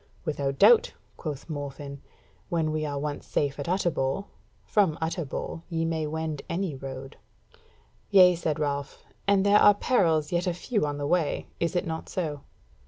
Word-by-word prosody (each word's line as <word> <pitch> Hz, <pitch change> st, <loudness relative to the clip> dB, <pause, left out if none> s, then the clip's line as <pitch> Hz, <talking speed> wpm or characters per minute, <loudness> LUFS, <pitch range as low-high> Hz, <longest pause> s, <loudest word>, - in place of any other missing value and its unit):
"Without 140 Hz, -3 st, -1 dB
doubt," 220 Hz, +6 st, +6 dB, 0.2 s
quoth 150 Hz, -4 st, -6 dB
Morfinn, 145 Hz, -2 st, -6 dB, 0.5 s
"when 160 Hz, -2 st, 0 dB
we 155 Hz, 0 st, -1 dB
are 145 Hz, -1 st, -3 dB
once 145 Hz, 0 st, -4 dB
safe 140 Hz, -1 st, -1 dB
at 145 Hz, -, -4 dB
Utterbol. 175 Hz, -2 st, 0 dB, 0.4 s
From 195 Hz, -7 st, +2 dB
Utterbol 160 Hz, -1 st, -3 dB
ye 165 Hz, -2 st, -1 dB
may 160 Hz, -2 st, -1 dB
wend 160 Hz, -1 st, -3 dB
any 180 Hz, -2 st, -1 dB
road." 135 Hz, 0 st, -8 dB, 0.9 s
"Yea," 185 Hz, -3 st, +7 dB
said 165 Hz, -3 st, -1 dB
Ralph, 140 Hz, -2 st, -3 dB, 0.2 s
"and 200 Hz, -1 st, +4 dB
there 205 Hz, +1 st, +6 dB
are 205 Hz, -, +7 dB
perils 165 Hz, -11 st, +2 dB
yet 175 Hz, +1 st, 0 dB
a 175 Hz, -, 0 dB
few 205 Hz, -, -1 dB
on 145 Hz, 0 st, -3 dB
the 145 Hz, -, -3 dB
way, 165 Hz, 0 st, +1 dB
is 170 Hz, +2 st, -1 dB
it 175 Hz, -, +1 dB
not 160 Hz, 0 st, -5 dB
so?" 150 Hz, -6 st, -3 dB
160 Hz, 165 wpm, -27 LUFS, 145-180 Hz, 0.9 s, Yea